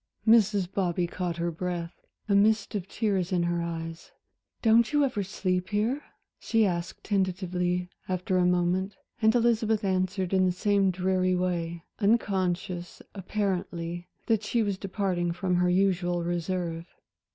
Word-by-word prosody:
Mrs. 210 -4 +5
Bobby 180 -2 0
caught 175 0 -3
her 170 0 -1
breath, 170 0 -4 0.3
a 205 - +1
mist 210 +1 +3
of 195 -3 -3
tears 195 -4 -1
in 180 -2 +2
her 170 0 0
eyes. 165 -1 -5 0.5
"Don't 230 +2 +5
you 295 -1 +4
ever 245 -6 -1
sleep 185 -1 -2
here?" 220 +7 0 0.4
she 225 -1 +2
asked 170 -2 -3
tentatively 180 -2 0 0.2
after 185 0 0
a 180 - +3
moment, 180 +2 +1 0.3
and 220 +1 +4
Elizabeth 225 -2 +2
answered 185 -1 0
in 185 -1 +4
the - - +2
same 200 +1 +2
dreary 185 0 +1
way, 170 -2 -2 0.2
unconscious, 190 -4 0
apparently, 180 -3 -3 0.2
that 220 -2 +2
she 220 +2 0
was 200 -2 -2
departing 185 -3 -1
from 180 0 0
her 180 0 +3
usual 180 -2 +1
reserve. 170 -1 -2
185 Hz, 140 wpm, -28 LUFS, 175-205 Hz, 0.5 s, Mrs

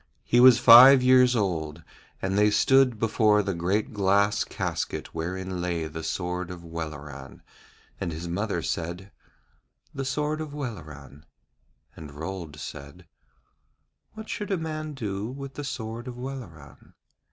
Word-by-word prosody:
He 120 - +2
was 125 -1 +8
five 125 +2 +9
years 125 -1 +5
old, 80 -7 -2 0.4
and 95 0 -1
they 105 +1 +4
stood 135 +2 +3
before 110 -1 +2
the 100 -1 -2
great 95 +8 -1
glass 100 0 +2
casket - - -4
wherein 95 +2 -4
lay 85 -2 -2
the 80 +1 -7
sword 90 +2 -3
of 90 -1 -9
Welleran, 75 -5 -8 0.6
and 90 -3 -3
his 80 +2 -6
mother 90 0 -2
said: 85 +4 -4 0.8
'The 135 -1 -4
sword 150 +3 -2
of 150 -2 -7
Welleran.' 75 - -8 0.7
And 75 -3 -11
Rold 80 -1 -6
said: 70 +7 -9 1.1
'What 220 0 -9
should 210 - -5
a 195 - 0
man 155 -2 -5
do 105 -4 -4
with 135 +1 -8
the 145 - -6
sword 115 -2 -6
of 125 -1 -7
Welleran?' 120 - -10
100 Hz, 140 wpm, -26 LUFS, 85-125 Hz, 1.1 s, five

